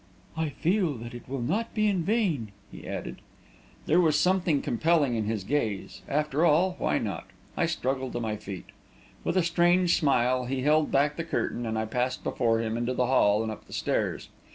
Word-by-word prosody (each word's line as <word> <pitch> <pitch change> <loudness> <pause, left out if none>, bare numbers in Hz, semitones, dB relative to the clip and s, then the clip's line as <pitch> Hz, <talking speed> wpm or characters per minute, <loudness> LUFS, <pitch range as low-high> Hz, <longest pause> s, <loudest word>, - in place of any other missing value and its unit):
"I 160 -1 -1
feel 170 +1 0
that 120 0 -8
it 120 +1 -10
will 135 -2 -3
not 225 - -2
be 215 -1 +2
in 195 -4 +1
vain!" 165 - 0 0.2
he - - -10
added. - - -5 0.7
There 170 +4 +4
was 155 -3 +3
something 180 -3 +2
compelling 150 0 +2
in 110 -2 -1
his 110 -2 -2
gaze. 110 -5 -2
After 150 +1 0
all, 175 +3 +4
why - - +1
not? - - -4 0.3
I - - +1
struggled 130 0 -2
to 120 - -2
my 110 -2 -2
feet. 100 -3 -8 0.6
With - - 0
a 185 - +4
strange 175 +1 +3
smile, 125 -3 +2
he 130 +1 -2
held 150 +1 +3
back 140 +2 +2
the 165 - -2
curtain, 120 -7 -2
and 110 0 -2
I 110 - 0
passed 125 +3 -2
before 115 -3 +1
him 115 0 -2
into 120 +2 -1
the 125 - +2
hall 110 -4 +3
and 110 - -3
up 110 - -10
the - - -12
stairs. - - -1
135 Hz, 200 wpm, -27 LUFS, 120-165 Hz, 0.7 s, There